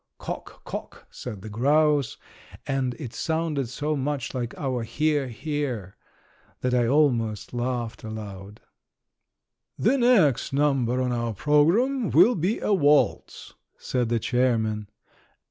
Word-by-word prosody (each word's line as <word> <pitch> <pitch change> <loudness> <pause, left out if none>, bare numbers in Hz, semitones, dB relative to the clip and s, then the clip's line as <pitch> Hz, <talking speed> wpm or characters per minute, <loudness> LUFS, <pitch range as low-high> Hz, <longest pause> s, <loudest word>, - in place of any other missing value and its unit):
"Cock, - - -7
cock!" - - -7
said 105 -6 -8
the 110 - -7
grouse, 145 +4 +2 0.5
and 130 -2 -1
it 130 -8 -8
sounded 160 -6 -1
so 150 +4 -2
much 140 -2 -2
like 120 -3 -4
our 130 -4 -2
"hear, 145 +5 0
hear!" 125 - -4 0.7
that 125 0 0
I 120 -2 +3
almost 120 -7 +1
laughed 120 -2 -3
aloud. 105 -2 -8 1.2
"The 265 +6 +2
next 195 - +3
number 135 -3 +1
on 125 - -1
our 120 -2 -2
program 200 - +2
will 245 - +6
be 190 +2 0
a 210 - +1
waltz," 150 -5 +2 0.2
said 125 -3 -1
the 120 - +2
chairman. 110 -4 0
130 Hz, 125 wpm, -25 LUFS, 115-150 Hz, 1.2 s, will